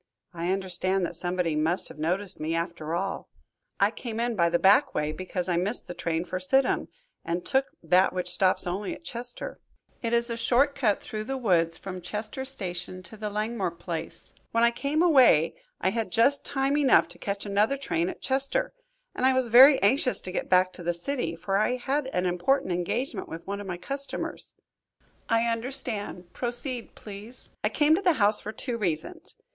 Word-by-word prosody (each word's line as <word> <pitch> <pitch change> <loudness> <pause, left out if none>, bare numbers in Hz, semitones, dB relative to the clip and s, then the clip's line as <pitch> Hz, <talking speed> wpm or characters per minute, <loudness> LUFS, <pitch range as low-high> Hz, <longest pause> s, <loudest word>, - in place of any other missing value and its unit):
"I 170 +1 -3
understand 190 0 -1
that 170 - -5
somebody 175 -1 0
must 160 +4 +1
have - - -12
noticed 180 +5 -2
me 160 +2 -2
after 165 -1 -3
all. 195 +3 -3 0.5
I - - +4
came 230 -2 -6
in 235 0 0
by 170 -3 +3
the 170 - +2
back 205 +11 +4
way 150 0 0
because 180 +2 -2
I 175 -2 +1
missed 200 +7 +3
the - - -7
train 170 -1 -2
for 185 +1 -4
Sidham, 265 +9 +2 0.4
and 175 +1 -3
took 270 0 +1 0.2
that 180 +3 +4
which 180 -1 -3
stops 185 +1 +3
only 185 +3 -3
at - - -16
Chester. 245 -4 -4 0.4
It 230 - -2
is 235 0 +1
a - - -1
short 255 +5 +3
cut 235 -7 0
through 215 0 -5
the 270 +2 -3
woods 170 -8 +2
from 185 -2 -7
Chester 215 +8 -5
Station 185 -7 -6
to 200 - -9
the 210 0 -4
Langmore 210 -1 -2
place. 170 -1 -7 0.2
When 230 0 +2
I 235 - +5
came 285 +6 0
away 255 - +5 0.3
I 190 - +1
had 225 +1 -3
just 270 +5 +4
time 275 0 0
enough 275 -3 +5
to - - -12
catch 200 0 -4
another 210 +7 +1
train 170 -10 -1
at - - -9
Chester, 275 - +1 0.4
and - - -4
I 260 0 +5
was 260 -2 +1
very 265 +4 +8
anxious 250 +5 +4
to 185 - -4
get - - -3
back 185 0 +4
to - - -9
the 175 0 -1
city, 170 -1 -2
for 180 +4 -1
I 215 +4 +1
had 265 +3 -2
an 185 -9 -1
important 180 +6 +1
engagement 195 +6 -2
with 165 +1 -8
one 200 +1 -4
of 200 - -8
my 180 -2 -4
customers." 275 +8 -4 0.7
"I 230 0 +3
understand. 230 -6 -3
Proceed, 245 0 -3
please." 210 +4 -10
"I - - +2
came 300 0 +3
to 345 - +2
the 360 -3 +4
house 210 -5 +3
for 215 - -5
two 235 +1 -3
reasons. 190 - -3
205 Hz, 195 wpm, -27 LUFS, 180-250 Hz, 0.7 s, very